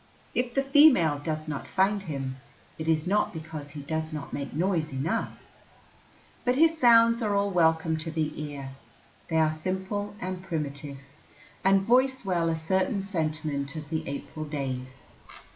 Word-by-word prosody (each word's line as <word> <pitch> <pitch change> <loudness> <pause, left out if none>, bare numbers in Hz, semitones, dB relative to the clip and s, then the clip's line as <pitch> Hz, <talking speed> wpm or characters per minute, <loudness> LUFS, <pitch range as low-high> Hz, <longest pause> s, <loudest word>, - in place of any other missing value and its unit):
If 245 -1 -1
the 275 - +3
female 270 - +5
does 155 +1 -3
not 145 -2 -4
find 200 +1 +2
him, 135 -7 -4 0.4
it 160 - -4
is 155 -1 +2
not 205 +3 +2
because 155 -3 -7
he 145 0 -8
does 160 +2 -3
not 150 -2 -6
make 140 -1 -4
noise 165 -1 0
enough. 145 +12 -1 1.1
But 250 0 +2
his 325 +3 +5
sounds 230 -4 +6
are 210 -3 +1
all 200 0 +1
welcome 160 -2 +2
to 160 +1 -2
the 155 -1 -1
ear. 140 -3 -6 0.6
They 160 - +1
are 155 -1 +3
simple 190 +5 -3
and 185 0 -4
primitive, 145 -5 -4 0.7
and 195 0 +4
voice 255 +3 +3
well 170 -3 +1
a 165 - +1
certain 190 +5 0
sentiment 155 -6 -2
of 155 -1 -7
the 160 - -2
April 140 +2 -5
days. 130 -3 -5
160 Hz, 160 wpm, -27 LUFS, 150-200 Hz, 1.1 s, sounds